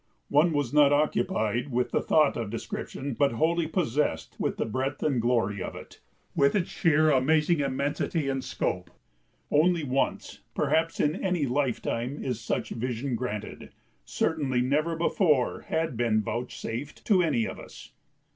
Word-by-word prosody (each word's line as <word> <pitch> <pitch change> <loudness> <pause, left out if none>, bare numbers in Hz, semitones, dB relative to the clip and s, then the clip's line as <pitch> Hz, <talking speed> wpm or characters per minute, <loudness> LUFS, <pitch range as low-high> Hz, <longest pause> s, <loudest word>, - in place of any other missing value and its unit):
One 150 +4 +4
was 145 -4 -1
not 145 -1 +6
occupied 145 - +1
with 125 +1 0
the - - +1
thought 155 -2 +3
of 115 -3 -3
description 130 +4 -5
but 140 +1 +2
wholly 165 +6 +1
possessed 150 - -1
with - - -1
the - - 0
breadth 130 +5 -3
and 135 -6 +1
glory 110 -5 +1
of - - -5
it, - - -11 0.4
with 140 +5 +3
its 185 -4 0
sheer, 155 -2 +3
amazing 150 +4 +3
immensity 140 +2 -1
and 135 -1 -1
scope. - - -2 0.6
Only 165 +2 +3
once, 135 -1 -1 0.2
perhaps, 165 +1 +1
in 150 +2 +2
any 180 -6 +1
lifetime 125 -1 -1
is 125 -4 -3
such - - -2
vision 125 +2 -3
granted, 110 -3 -5 0.3
certainly 135 - 0
never 150 +6 +1
before 160 -5 +1
had 160 -5 -1
been 110 -2 +1
vouchsafed 120 +3 -5
to 195 -4 +4
any 145 -10 +1
of - - -6
us. - - -12
140 Hz, 150 wpm, -27 LUFS, 120-155 Hz, 0.6 s, not